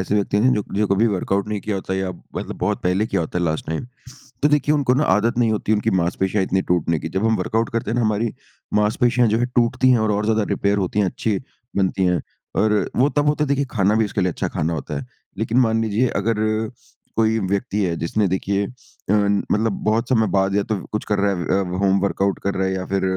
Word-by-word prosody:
ऐसे 95 Hz, -, -1 dB
व्यक्ति 100 Hz, -1 st, +1 dB
है 125 Hz, +5 st, +4 dB, 0.2 s
जो 105 Hz, +1 st, +2 dB
कभी 100 Hz, +3 st, +2 dB
वर्कआउट 100 Hz, 0 st, -1 dB
नहीं 105 Hz, -1 st, -2 dB
किया 105 Hz, -1 st, -2 dB
होता 95 Hz, 0 st, -3 dB
या 95 Hz, -1 st, -1 dB, 0.3 s
मतलब -, -, -4 dB
बहुत -, -, -1 dB
पहले 95 Hz, +4 st, +1 dB
किया -, -, -1 dB
होता 85 Hz, +2 st, -2 dB
है 90 Hz, -, 0 dB
लास्ट 80 Hz, -1 st, -2 dB
टाइम। 80 Hz, +8 st, -3 dB, 0.6 s
तो -, -, +6 dB
देखिए 150 Hz, 0 st, +2 dB
उनको 140 Hz, -4 st, +2 dB
ना 140 Hz, +4 st, +2 dB
आदत 115 Hz, +1 st, +2 dB
नहीं 115 Hz, -2 st, +3 dB
होती 110 Hz, 0 st, 0 dB
उनकी 110 Hz, +1 st, +1 dB
मांसपेशियाँ 95 Hz, +3 st, 0 dB
इतनी 95 Hz, 0 st, 0 dB
टूटने 85 Hz, -2 st, +1 dB
की। -, -, -5 dB
जब 95 Hz, +6 st, -1 dB
हम 110 Hz, 0 st, +3 dB
वर्कआउट 115 Hz, +1 st, 0 dB
करते 115 Hz, -2 st, -1 dB
हैं -, -, 0 dB
ना, -, -, +2 dB
हमारी 110 Hz, 0 st, 0 dB, 0.4 s
मांसपेशियाँ 120 Hz, +3 st, +3 dB
जो 110 Hz, +1 st, +2 dB
है 120 Hz, -, +2 dB
टूटती 120 Hz, +2 st, +3 dB
है 120 Hz, -, +4 dB
और, 110 Hz, -1 st, +1 dB
और 105 Hz, +1 st, 0 dB
ज़्यादा 110 Hz, 0 st, +2 dB
रिपेयर 100 Hz, 0 st, +1 dB
होती 100 Hz, +1 st, -1 dB
है, 100 Hz, -, +3 dB
अच्छी 100 Hz, +2 st, -1 dB, 0.4 s
बनती 95 Hz, -1 st, +1 dB
है 90 Hz, -1 st, +2 dB, 0.4 s
और 105 Hz, -1 st, +2 dB
वो 135 Hz, +4 st, +3 dB
तब 145 Hz, 0 st, 0 dB
होता 150 Hz, +1 st, +2 dB
है, -, -, -1 dB
देखिए 140 Hz, 0 st, +1 dB
खाना 100 Hz, -1 st, +2 dB
भी 110 Hz, 0 st, +3 dB
उसके 100 Hz, -, -2 dB
लिए 90 Hz, -1 st, +1 dB
अच्छा -, -, -3 dB
खाना 80 Hz, +2 st, -2 dB
होता 75 Hz, -2 st, -4 dB
है। -, -, -8 dB, 0.3 s
लेकिन 110 Hz, +2 st, -1 dB
मान 115 Hz, -2 st, +2 dB
लीजिए 110 Hz, +3 st, +1 dB
अगर 110 Hz, +1 st, 0 dB, 0.7 s
कोई 110 Hz, 0 st, +2 dB
व्यक्ति 100 Hz, +2 st, -1 dB
है 85 Hz, -3 st, 0 dB
जिसने 100 Hz, +6 st, 0 dB
देखिए 100 Hz, +2 st, 0 dB
अ, -, -, -12 dB, 0.4 s
मतलब 105 Hz, +1 st, +1 dB
बहुत 115 Hz, +3 st, +1 dB
समय 110 Hz, -4 st, +3 dB
बाद 95 Hz, 0 st, +1 dB
या 100 Hz, -, +2 dB
तो 110 Hz, -, -2 dB, 0.2 s
कुछ 105 Hz, -, -3 dB
कर 105 Hz, -, 0 dB
रहा 100 Hz, 0 st, +2 dB
है 95 Hz, +1 st, 0 dB
अ, 90 Hz, 0 st, -4 dB
होम 100 Hz, 0 st, +3 dB
वर्कआउट 100 Hz, 0 st, 0 dB
कर 100 Hz, -, 0 dB
रहा 95 Hz, 0 st, 0 dB
है, 95 Hz, -, -1 dB
या 95 Hz, 0 st, -3 dB
फिर 95 Hz, 0 st, -1 dB
105 Hz, 240 wpm, -21 LUFS, 95-115 Hz, 0.7 s, तो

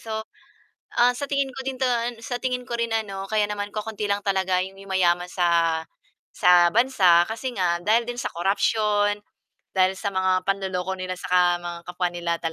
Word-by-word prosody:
So, 220 Hz, -1 st, -5 dB, 0.8 s
ah, 245 Hz, +1 st, +4 dB
sa 285 Hz, -, -3 dB
tingin 280 Hz, -1 st, 0 dB
ko 265 Hz, 0 st, -8 dB
doon, 245 Hz, -3 st, -1 dB
sa 245 Hz, +2 st, -4 dB
tingin 250 Hz, 0 st, -3 dB
ko 235 Hz, -, -2 dB
rin 235 Hz, -1 st, -2 dB
ano 200 Hz, -3 st, -2 dB
kaya 210 Hz, 0 st, 0 dB
naman 205 Hz, 0 st, -4 dB
kaunti 215 Hz, 0 st, -4 dB
lang 200 Hz, 0 st, 0 dB
talaga 190 Hz, -2 st, +1 dB
'yong 190 Hz, +1 st, -5 dB
yumayaman 180 Hz, -2 st, +1 dB
sa 170 Hz, -2 st, +2 dB, 0.5 s
sa 175 Hz, -1 st, +6 dB
bansa 185 Hz, -6 st, +4 dB
kasi 235 Hz, +3 st, -5 dB
nga 175 Hz, -2 st, +1 dB
dahil 225 Hz, +5 st, +2 dB
din 245 Hz, 0 st, -6 dB
sa -, -, -2 dB
corruption, 205 Hz, +2 st, +1 dB, 0.6 s
dahil 185 Hz, 0 st, +3 dB
sa 200 Hz, -, -2 dB
mga 185 Hz, 0 st, +2 dB
panloloko 190 Hz, -1 st, -1 dB
nila 185 Hz, 0 st, -4 dB
sa -, -, -7 dB
ka 180 Hz, -, +5 dB, 0.2 s
mga 175 Hz, 0 st, -5 dB
kapwa 180 Hz, 0 st, -1 dB
nila 175 Hz, -1 st, -3 dB
kapwa 165 Hz, -, -3 dB
200 Hz, 180 wpm, -24 LUFS, 180-230 Hz, 0.8 s, sa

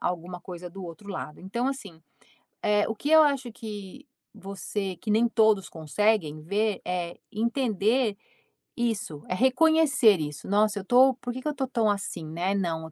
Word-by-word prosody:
alguma 180 Hz, 0 st, -3 dB
coisa 180 Hz, -1 st, -8 dB
do 195 Hz, +2 st, -9 dB
outro 185 Hz, +4 st, -9 dB
lado. 150 Hz, -5 st, -6 dB
Então, 235 Hz, +7 st, -2 dB
assim, 200 Hz, -12 st, -7 dB, 0.6 s
eh, 210 Hz, 0 st, +3 dB
o 225 Hz, -, -3 dB
que 290 Hz, +8 st, -3 dB
eu 315 Hz, -, +9 dB
acho 275 Hz, -5 st, +1 dB
que 215 Hz, +4 st, -9 dB, 0.3 s
você 195 Hz, 0 st, -5 dB
que 210 Hz, +5 st, -4 dB
nem 225 Hz, +3 st, +4 dB
todos 220 Hz, -4 st, +3 dB
conseguem 160 Hz, -1 st, 0 dB
ver 205 Hz, +5 st, -1 dB
é 175 Hz, -1 st, -3 dB
entender 230 Hz, 0 st, +1 dB, 0.6 s
isso, 220 Hz, -, -2 dB
é -, -, 0 dB
reconhecer 265 Hz, -, +4 dB
isso. 150 Hz, -1 st, -5 dB
"Nossa 205 Hz, 0 st, +2 dB
eu -, -, -7 dB
estou 255 Hz, +5 st, +5 dB
por 245 Hz, -1 st, -6 dB
que 255 Hz, -, -6 dB
que 305 Hz, -, -5 dB
eu -, -, +1 dB
estou 265 Hz, -2 st, -2 dB
tão 230 Hz, -4 st, +1 dB
assim, 195 Hz, -5 st, -3 dB
né, 175 Hz, +5 st, -1 dB
não, 165 Hz, -4 st, -2 dB
205 Hz, 170 wpm, -27 LUFS, 180-235 Hz, 0.6 s, eu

